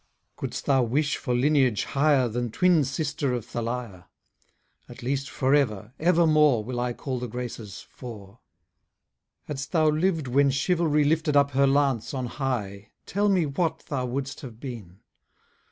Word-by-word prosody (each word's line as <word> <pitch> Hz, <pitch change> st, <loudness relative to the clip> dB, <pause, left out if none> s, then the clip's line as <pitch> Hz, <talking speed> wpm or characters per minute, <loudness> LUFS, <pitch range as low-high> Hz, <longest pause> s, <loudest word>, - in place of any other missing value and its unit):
Couldst -, -, -5 dB
thou 135 Hz, -2 st, +3 dB
wish 140 Hz, +5 st, 0 dB
for 125 Hz, -3 st, -2 dB
lineage 130 Hz, -4 st, +2 dB
higher 140 Hz, -2 st, +2 dB
Than 120 Hz, +1 st, -2 dB
twin 175 Hz, +5 st, +3 dB
sister 145 Hz, 0 st, -2 dB
of 120 Hz, -3 st, -5 dB
Thalia? 115 Hz, -6 st, -5 dB, 0.8 s
At -, -, -11 dB
least 135 Hz, +2 st, -2 dB
for 130 Hz, +1 st, 0 dB
ever, 110 Hz, -6 st, +1 dB
evermore, 155 Hz, -7 st, +4 dB
Will 120 Hz, +2 st, -4 dB
I 125 Hz, 0 st, -1 dB
call 130 Hz, 0 st, -4 dB
the 125 Hz, -, -4 dB
Graces 115 Hz, -4 st, -6 dB
four. 110 Hz, -3 st, -11 dB, 1.0 s
Hadst 140 Hz, +1 st, -6 dB
thou 155 Hz, -2 st, +4 dB
liv'd 160 Hz, -2 st, 0 dB
when 140 Hz, +3 st, +3 dB
chivalry 150 Hz, +2 st, +2 dB
Lifted 150 Hz, 0 st, +2 dB
up 140 Hz, 0 st, +4 dB
her 140 Hz, +1 st, +3 dB
lance 135 Hz, -3 st, +1 dB
on 130 Hz, -1 st, -2 dB
high, 110 Hz, -7 st, -4 dB, 0.2 s
Tell 205 Hz, +2 st, +1 dB
me 185 Hz, -4 st, +3 dB
what 160 Hz, +4 st, -2 dB
thou 130 Hz, -3 st, -1 dB
wouldst 130 Hz, +3 st, -4 dB
have 120 Hz, -6 st, -10 dB
been? 110 Hz, -9 st, -9 dB
135 Hz, 155 wpm, -26 LUFS, 120-150 Hz, 1.0 s, evermore